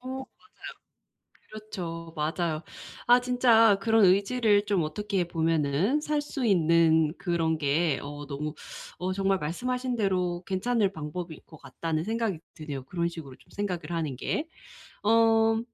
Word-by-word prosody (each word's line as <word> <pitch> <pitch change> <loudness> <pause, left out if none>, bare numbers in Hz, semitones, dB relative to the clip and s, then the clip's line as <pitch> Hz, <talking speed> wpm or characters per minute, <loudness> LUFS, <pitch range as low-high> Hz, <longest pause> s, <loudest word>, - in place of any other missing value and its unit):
어 255 - -9
맞아요. 265 0 -4 1.3
그렇죠. 170 -6 -7
맞아요. 155 +1 -1 0.4
아 245 +1 +6
진짜 235 -4 +4
그런 225 -1 +4
의지를 205 +2 +3
좀 200 -4 +1
어떻게 190 +4 -2
보면은 165 - +1
살 300 0 0
수 285 -3 -4
있는 165 -5 +4
그런 165 -3 0
게 150 +2 +1
어 145 +1 -7
너무 150 +2 -4 0.4
어 185 +1 -2
정말 195 0 +1
말씀하신 250 +10 -2
대로 180 -4 0
괜찮을 200 +1 0
방법일 160 0 -6
것 155 - -14
같다는 160 -1 -3
생각이 225 -4 -1 0.2
드네요 145 -5 -6
그런 170 +4 -2
식으로 155 -6 -9
좀 - - -24
생각을 185 -4 -4
하는 155 -6 -2
게. 310 - -2 0.5
어 225 0 +4
180 Hz, 280 characters per minute, -27 LUFS, 160-225 Hz, 1.3 s, 아